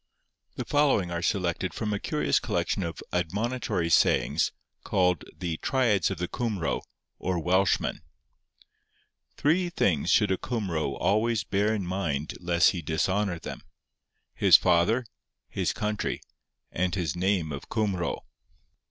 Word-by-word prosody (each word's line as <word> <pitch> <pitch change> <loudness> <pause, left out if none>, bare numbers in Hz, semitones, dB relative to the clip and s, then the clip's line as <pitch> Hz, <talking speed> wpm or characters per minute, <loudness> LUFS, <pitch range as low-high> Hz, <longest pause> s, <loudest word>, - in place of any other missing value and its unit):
The - - -4
following 140 -12 +2
are 85 0 -2
selected 90 0 -1
from 105 -2 -2
a 100 - -1
curious 75 -6 +1
collection - - -1
of 85 -2 -5
admonitory 95 0 -1
sayings, - - +3 0.3
called 90 -3 +1
the 85 -3 -3
'Triads 115 -9 +2
of 95 - -4
the 90 +2 -2
Cumro, 105 -7 -2 0.4
or 90 -1 -1
Welshman:'— 95 +4 +1 1.4
'Three 175 +5 +2
things 90 - +1
should 105 +3 +4
a 95 - +2
Cumro 85 - -2
always 110 +3 +2
bear 100 +3 +1
in 100 -4 -3
mind 80 -6 -2
lest 85 -1 +3
he 90 - -4
dishonour 90 +4 0
them: - - -7 0.7
his - - +7
father, 95 +8 +2 0.4
his - - -1
country, 105 -1 -2 0.5
and 90 +1 -1
his 85 -7 -2
name 90 -3 0
of 70 -1 -7
Cumro. 100 -6 -1
95 Hz, 130 wpm, -27 LUFS, 85-105 Hz, 1.4 s, his